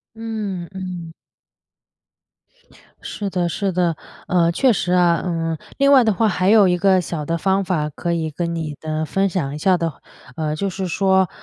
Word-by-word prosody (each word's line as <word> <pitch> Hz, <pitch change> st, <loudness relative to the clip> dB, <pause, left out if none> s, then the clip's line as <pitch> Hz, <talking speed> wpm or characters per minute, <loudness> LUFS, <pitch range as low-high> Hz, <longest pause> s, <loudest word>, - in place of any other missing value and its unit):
嗯， 215 Hz, -6 st, -4 dB
嗯。 180 Hz, -3 st, -6 dB, 1.9 s
是 205 Hz, -2 st, -5 dB
的， 180 Hz, -2 st, -1 dB
是 195 Hz, +2 st, -1 dB
的， 175 Hz, -2 st, +1 dB, 0.3 s
呃， 170 Hz, -2 st, +3 dB
确 255 Hz, +9 st, +3 dB
实 180 Hz, -4 st, 0 dB
啊。 175 Hz, -2 st, +3 dB
嗯， 165 Hz, -2 st, -2 dB, 0.2 s
另 275 Hz, 0 st, +4 dB
外 265 Hz, -3 st, +7 dB
的 220 Hz, -2 st, +2 dB
话 220 Hz, +4 st, +2 dB
还 185 Hz, -1 st, +1 dB
有 210 Hz, -3 st, +6 dB
一 180 Hz, -1 st, +2 dB
个 190 Hz, 0 st, +3 dB
小 165 Hz, -3 st, -4 dB
的 165 Hz, +2 st, -1 dB
方 195 Hz, +3 st, +1 dB
法 160 Hz, -5 st, -1 dB
可 170 Hz, +3 st, -3 dB
以 160 Hz, -2 st, -1 dB
跟 170 Hz, +2 st, -3 dB
你 155 Hz, -3 st, -4 dB
的 155 Hz, 0 st, -3 dB
分 195 Hz, +5 st, +1 dB
享 165 Hz, -7 st, -2 dB
一 -, -, -5 dB
下 185 Hz, +4 st, +3 dB
的 165 Hz, -2 st, -2 dB, 0.4 s
呃， 155 Hz, -1 st, -2 dB
就 195 Hz, +5 st, -2 dB
是 190 Hz, 0 st, -4 dB
说， 190 Hz, 0 st, +2 dB
180 Hz, 195 characters per minute, -20 LUFS, 165-195 Hz, 1.9 s, 外